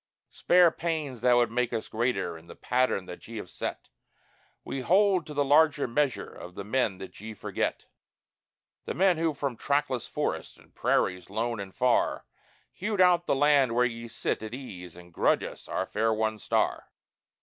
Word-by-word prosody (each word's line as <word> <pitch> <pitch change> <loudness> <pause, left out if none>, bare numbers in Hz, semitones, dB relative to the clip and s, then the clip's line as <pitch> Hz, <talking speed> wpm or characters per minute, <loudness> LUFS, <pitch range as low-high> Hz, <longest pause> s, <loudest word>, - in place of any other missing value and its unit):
Spare 180 -2 +5
pains 155 -9 -3
that 125 0 +5
would 120 -2 +3
make 125 0 0
us 115 -2 -3
greater 105 -7 -1
in 80 +1 -13
the - - -11
pattern 125 -6 0
that 90 - -10
ye 115 0 -7
have 95 -4 -7
set; - - -5 0.8
We 135 - -4
hold 185 +3 +3
to 150 - -8
the 145 0 +2
larger 145 0 +4
measure 140 +2 -1
of 90 0 -11
the 100 - -5
men 110 -2 0
that 95 - -10
ye 110 0 -7
forget - - -3 1.0
The - - -4
men 185 -2 +3
who, 165 -2 0
from 140 -4 -3
trackless 140 -2 0
forests - - -3
and - - -22
prairies 90 -1 0
lone 115 +2 -2
and 100 -1 -6
far, 125 +3 +1 0.5
Hewed 205 +1 -3
out 180 -1 +5
the - - +2
land 140 -4 +4
where 125 +1 +4
ye 115 -1 -4
sit 115 - -2
at 110 +2 -6
ease 90 -10 -9
and 90 -1 -14
grudge - - +2
us - - -8
our - - -2
fair 110 +1 0
won 110 0 -1
star. - - 0
125 Hz, 185 wpm, -28 LUFS, 110-145 Hz, 1.0 s, Spare